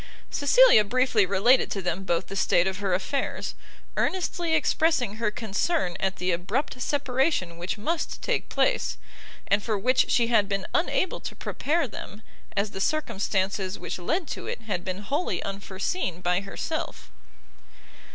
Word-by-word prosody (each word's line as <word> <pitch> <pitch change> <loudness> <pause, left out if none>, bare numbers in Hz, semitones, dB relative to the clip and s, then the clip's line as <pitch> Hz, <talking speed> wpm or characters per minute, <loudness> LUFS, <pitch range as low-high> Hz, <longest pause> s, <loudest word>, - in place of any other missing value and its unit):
Cecilia 305 - +6
briefly 235 -2 +2
related 200 +7 +4
to 195 - -3
them 180 +2 -1
both 170 0 0
the 195 - -7
state 175 -2 +3
of 190 0 -2
her 195 -3 +1
affairs, 275 +9 -2 0.4
earnestly 345 -3 0
expressing 310 -8 +1
her 225 -2 +1
concern 210 - -1
at 190 0 0
the 180 0 -1
abrupt 210 - -2
separation 265 - 0
which 175 +4 -3
must 315 +10 -2
take - - -1
place, - - +1 0.5
and 200 +1 +3
for 215 0 -1
which 255 +6 +3
she 235 - +4
had 220 -4 +3
been 195 -1 -1
unable 350 +1 +1
to - - -7
prepare 315 +1 -1
them, 210 -1 -9 0.3
as 200 +1 +1
the 195 - -5
circumstances 195 -9 0
which - - -5
led 325 - -1
to - - -5
it - - -4
had 200 -5 -3
been 185 +2 -4
wholly 290 - -1
unforeseen 195 - -3
by 180 +1 +1
herself. 310 +10 -5
210 Hz, 150 wpm, -26 LUFS, 190-285 Hz, 0.5 s, Cecilia